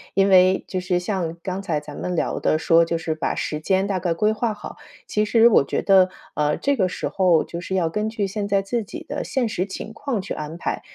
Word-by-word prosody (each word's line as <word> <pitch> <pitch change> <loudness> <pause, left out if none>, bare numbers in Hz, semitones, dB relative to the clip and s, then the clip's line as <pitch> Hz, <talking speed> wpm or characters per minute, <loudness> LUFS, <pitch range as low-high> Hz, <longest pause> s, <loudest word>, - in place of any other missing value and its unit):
因 195 0 +4
为 185 0 +5
就 185 - -2
是 180 0 0
像 175 -3 -3
刚 185 +1 -3
才 170 -6 -1
咱 150 -1 -10
们 180 - -3
聊 - - -1
的 155 - +2
说 165 +1 +4
就 165 0 -1
是 160 -1 -2
把 155 - -2
时 150 - -3
间 190 +4 +1
大 195 -2 -1
概 175 -1 0
规 210 +6 +2
划 220 0 -1
好， - - -9 0.3
其 210 0 0
实 225 +2 +5
我 210 - +5
觉 - - -1
得， 190 -2 +5 0.3
呃， 150 0 +1
这 280 0 +1
个 190 -4 +2
时 - - -4
候 180 -4 +3
就 170 - -7
是 190 +1 -4
要 170 -3 +1
根 210 +6 -2
据 220 -2 -2
现 200 +1 -3
在 200 -1 +2
自 225 +4 -2
己 330 - -8
的 290 - -3
现 260 -3 0
实 185 -3 -1
情 200 +2 -7
况 245 -3 -3
去 - - -5
安 155 +2 -6
排。 - - -3
190 Hz, 270 characters per minute, -22 LUFS, 170-210 Hz, 0.3 s, 为